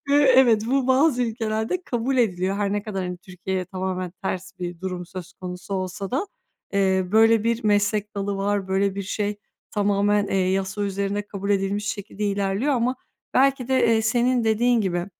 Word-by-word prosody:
Eee, 285 - +5 0.2
evet, 240 -5 +5
bu 265 +1 +1
bazı 260 0 +3
ülkelerde 225 +7 -2
kabul 250 -2 -1
ediliyor. 195 -5 +1
Her 200 -1 0
ne 205 0 -1
kadar 200 -3 -4
hani 180 0 -4
Türkiye'ye 185 -1 -4
tamamen 185 0 -3
ters 185 -1 -3
bir 175 -1 -5
durum 180 -2 -4
söz 180 -1 -8
konusu 180 +1 -6
olsa 190 +1 -4
da, 275 +10 -1 0.5
eee, 190 -2 +2
böyle 225 0 +5
bir 230 0 0
meslek 210 0 +1
dalı 200 0 -2
var. 200 -1 -1
Böyle 195 +1 +1
bir 200 - -3
şey 205 +1 -2 0.3
tamamen, 205 0 +2
eee, 195 - -1
yasa 190 +1 -1
üzerinde 200 +1 -2
kabul 200 0 -4
edilmiş 200 +1 0
şekilde 210 -1 -4
ilerliyor 200 +6 0
ama 250 +1 0 0.4
belki 265 -1 +3
de, 260 -2 +3
eee, 225 -1 +3
senin 240 +1 +2
dediğin 235 +2 +3
gibi, 175 -3 -1
205 Hz, 175 wpm, -24 LUFS, 190-230 Hz, 0.5 s, Eee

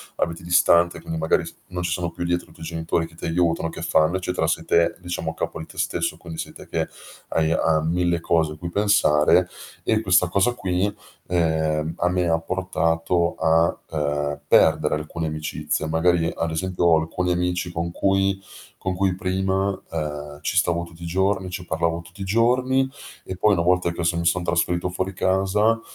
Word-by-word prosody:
abiti 85 +2 -2
distante, 85 0 +4
quindi 80 0 -4
magari 80 - +1
f - - -9
non 90 -1 -4
ci 85 - -1
sono 85 0 -1
più 90 - -6
dietro 85 0 -1
i - - -17
tuoi 80 - -10
genitori 80 0 -1
che 80 - -15
ti 80 - -8
aiutano, 85 -1 +1
che 80 - -7
fanno, 80 +2 +3
eccetera, 90 -3 -1
sei 80 0 -1
te, 85 0 +3
diciamo 90 -2 -4
a - - -11
capo - - -4
di 80 - -7
te - - -15
stesso, 80 - -1
quindi 80 -1 -9
sei - - -5
te - - -12
che - - -1 0.4
hai, 80 0 +1
uhm, 80 -1 +2
1000 85 -1 +1
cose 80 -2 +1
a - - -12
cui 85 +2 -6
pensare; 90 -4 +4 0.4
e 110 -1 +2
questa 90 -3 +4
cosa 100 +7 +2
qui, 95 -1 -1 0.4
ehm, 80 -2 0
a 90 - +1
me 90 -1 +1
ha 80 0 +2
portato 85 -1 0
a, 80 +1 +3
ehm, 75 -1 -1
perdere - - +4
alcune 80 +1 -4
amicizie. 75 0 -3
Magari 80 +1 +2
ad 85 - -1
esempio, 90 +2 -1
ho 85 -2 +6
alcuni 90 +3 -2
amici 90 0 -1
con 85 0 -3
cui 95 +1 +1 0.4
con 95 - -2
cui 95 0 +1
prima, 95 +1 -1
ehm, 75 -2 -4
ci - - -2
stavo 85 0 +2
tutti 85 0 -13
i 85 - -5
giorni, 95 +2 0
ci 90 0 -6
parlavo 85 0 -1
tutti 90 +4 -14
i - - -1
giorni, 125 +6 +2 0.4
e 95 - -6
poi 105 +3 +3
una 85 -2 +1
volta 90 -1 +2
che 85 0 -4
son 85 0 +1
mi 85 - -2
son 90 +1 +1
trasferito 85 +1 0
fuori 95 +1 -2
casa, 95 +5 +2
85 Hz, 195 wpm, -23 LUFS, 80-95 Hz, 0.4 s, ho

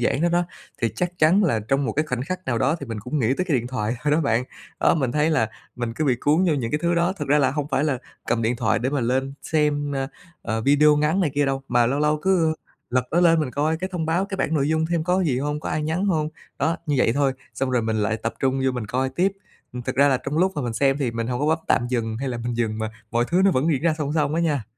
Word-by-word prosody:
giãn 125 +4 +1
đó 175 - +3
đó, 175 +1 +2 0.4
thì 115 - +3
chắc 180 0 -2
chắn 175 +7 +4
là 115 - +1
trong 135 +1 +2
một 110 - -1
cái 155 +2 0
khoảnh 125 -2 -2
khắc 185 +5 -5
nào 120 -3 0
đó, 140 +8 +2
thì 140 - -6
mình 115 -2 -5
cũng 125 +7 -3
nghĩ 115 - +1
tới 185 - 0
cái 150 -6 +2
điện 120 - -4
thoại 115 -3 -2
thôi 150 - +1
đó 160 - +3
bạn. 125 -4 +1 0.4
Đó, - - +4
mình 130 -6 0
thấy 150 +2 +2
là 110 -8 +1 0.3
mình 120 -2 -3
cứ 155 - -1
bị 130 -4 +2
cuốn 155 +6 +3
vô 165 -4 +2
những 120 -5 -2
cái 150 - 0
thứ 170 0 +2
đó. 175 +2 +2
Thực 195 - -6
ra 150 +1 +4
là 135 - +3
hông 145 +1 -2
phải 140 +1 +1
là 135 -5 0 0.3
cầm 115 -1 0
điện 120 +2 0
thoại 110 -2 +1
để 130 +4 -1
mà 145 - 0
lên 130 +3 0
xem, 145 -2 0
a, 135 0 -2 0.3
ờ, 110 0 -2
video 145 +4 +5
ngắn 155 +6 +2
này 155 -6 +1
kia 145 -1 +2
đâu, 135 0 -1
mà 120 -1 +3
lâu 135 +4 0
lâu 150 0 +2
cứ, 185 -4 +3
ơ, 160 - -1 0.4
lật 125 0 +1
nó 175 - +2
lên 165 -2 +5
mình 145 - -2
coi 155 +4 0
cái 185 +3 -4
thông 165 -3 -2
báo, 175 +4 +1
cái 200 -1 -5
bảng 160 - -1
nội 145 -1 +1
dung 160 0 +1
xem 165 -2 0
có 180 +1 +2
cái 185 - +1
gì 130 -3 +1
hông, 150 +2 -2
có - - -5
ai 155 - -1
nhắn 160 +6 -1
hông. 155 -5 +1 0.3
Đó, 160 +4 +1
như 150 - +1
vậy 115 - +3
thôi 140 -1 +2 0.2
xong 135 -1 -1
rồi 125 -2 +1
mình 110 0 -1
lại 110 +1 0
tập 115 +1 -4
trung 135 0 0
vô 130 - +3
mình 125 -4 -4
coi 130 +4 -1
tiếp. 180 +9 +1 0.4
Ừm, 125 0 -5
thực 130 +2 -3
ra 140 +1 +5
là 130 - +3
trong 140 +5 -3
lúc 190 +2 +3
mà 145 - -2
mình 120 -2 -2
xem 135 +4 +2
thì 130 -5 0
mình 115 0 -3
hổng 125 +1 -2
có 150 - +1
bấm 160 +1 +2
tạm 120 - +2
dừng, 115 -3 -1
hay 135 0 -3
là 120 - -3
mình 120 -1 -2
dừng, 110 -2 -1
mà 110 0 -3 0.2
mọi 120 0 +1
thứ 180 +2 +2
nó 195 - +6
vẫn 150 0 +1
diễn 140 - -1
ra 165 -2 +2
song 150 -1 -2
song 150 -1 +1
á 170 - +1
nha. 145 -9 0
140 Hz, 310 wpm, -23 LUFS, 125-160 Hz, 0.4 s, nó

